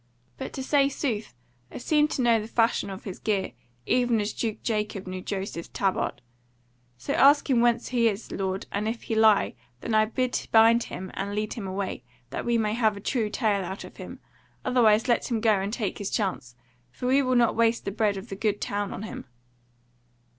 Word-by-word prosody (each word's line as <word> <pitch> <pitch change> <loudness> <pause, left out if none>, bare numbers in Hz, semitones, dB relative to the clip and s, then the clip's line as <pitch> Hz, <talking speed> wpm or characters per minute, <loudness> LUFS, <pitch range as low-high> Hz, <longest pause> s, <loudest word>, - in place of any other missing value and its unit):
But - - -6
to 265 - -4
say 275 0 +3
sooth 225 - -3 0.4
I - - -7
seem 300 +3 +2
to 265 - -2
know 230 -2 +4
the 215 - -7
fashion 230 -2 +1
of 190 -1 -7
his 190 -3 -7
gear, 205 -3 -1 0.3
even 245 -2 +2
as 210 +1 -2
Duke 220 -3 -3
Jacob 210 -4 -2
knew 185 0 -5
Joseph's 190 -4 -5
tabard. 190 -9 -1 0.7
So 125 - -3
ask 285 +2 +5
him 255 -4 +3
whence 235 0 +2
he 235 -2 +3
is, 210 +1 -6
lord, 190 0 -2
and 210 +2 -2
if 230 +1 -3
he - - -3
lie, 220 -2 +4 0.3
then 230 - -3
I 215 0 +5
bid 250 +3 -2
bind 230 +1 +6
him 185 +1 -7
and 200 +1 -4
lead 210 0 -2
him 215 -5 -6
away, 190 -8 -4 0.3
that - - -4
we 235 0 +2
may 215 -1 0
have 220 -3 +1
a - - -6
true 220 +1 -1
tale 210 -3 0
out 190 +2 -6
of - - -12
him; - - -8 0.5
otherwise 230 -3 +4
let 240 +1 +1
him 235 -3 0
go 215 -3 +3
and 195 +2 -2
take 215 -4 -3
his 205 - -3
chance; 185 - -2 0.3
for 185 - -8
we 265 +3 +4
will 255 -1 +1
not 235 -2 +3
waste 230 0 +2
the 200 - -2
bread 210 -1 0
of 195 +5 -8
the 195 - -5
Good 205 0 -1
Town 205 0 -2
on 205 - -6
him." 220 - -7
220 Hz, 210 wpm, -26 LUFS, 200-235 Hz, 0.7 s, bind